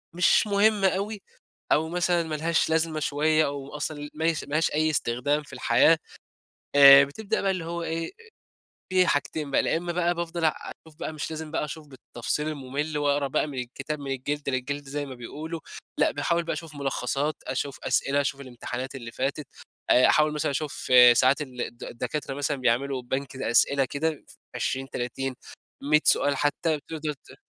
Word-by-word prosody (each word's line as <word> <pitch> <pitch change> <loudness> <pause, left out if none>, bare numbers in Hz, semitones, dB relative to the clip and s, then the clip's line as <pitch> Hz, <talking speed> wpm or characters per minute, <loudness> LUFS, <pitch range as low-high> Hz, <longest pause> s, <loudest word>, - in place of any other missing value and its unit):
مش 180 +4 +4
مهمة 205 0 +3
أوي 200 +2 -2 0.5
أو 160 +1 +3
مثلًا 175 0 +1
ما 160 -1 -4
لهاش 160 +2 +1
لازمة 160 -1 +1
شوية، 155 +2 +2
أو 140 -1 -5
أصلًا 145 0 -4
مايس 160 0 0
ما - - -12
لهاش 155 +1 +2
أي 155 +1 +2
استخدام 145 +1 0
في - - -15
الحياة، - - +4 0.8
آآ 140 0 +10
بتبدأ 195 +10 -3
بقى 195 - +1
اللي 185 -3 -2
هو 170 +1 -4
إيه، 165 0 -2
أ - - -12 0.8
في 185 -1 +4
حاجتين 145 -1 -1
بقى، - - +3
لا - - +1
إمّا 175 +1 -3
بقى 175 0 +1
بافضل 170 0 -3
أشوف 160 0 -3
بقى - - -4
مش 155 0 -5
لازم 160 -1 -6
بقى 160 - -1
أشوف 150 +1 -8
بالتفصيل 130 +2 -4
الممل 150 +1 -3
وأقرأ 145 -1 +1
بقى 135 - 0
من 140 -3 -6
الكتاب 135 +5 -5
من 140 -1 -6
الجلدة 140 +2 -3
للجلدة 140 +2 -3
زي 145 0 -3
ما 135 - -8
بيقولوا، 155 +7 -7 0.4
لأ - - +4
باحاول 170 +4 0
بقى 165 - -2
أشوف 165 -2 -7
ملخصات، 140 +1 -2
أشوف 135 +1 -3
أسئلة، 140 +1 +1
أشوف 140 0 -2
الامتحانات 130 0 -6
اللي 120 -4 -8
فاتت، 140 +4 -2 0.4
آآ 125 - +6
أحاول 150 0 +4
مثلًا 150 -1 -1
أشوف 140 -2 -3 0.2
ساعات 130 +4 +4
ال 130 -3 -8
الد 120 - -5
الدكاترة 130 +4 -4
مثلًا 145 +1 -1
بيعملوا 130 +1 0
بنك 130 +2 -4
الأسئلة 135 +2 +2
كده 150 +3 -3 0.3
ف20، 135 0 -2
30، 130 +2 -3 0.5
100 150 +2 +4
سؤال 145 0 +3
حتى 150 +2 0
تقدر 155 -1 -3
ت 140 - -18
145 Hz, 175 wpm, -26 LUFS, 135-160 Hz, 0.8 s, آآ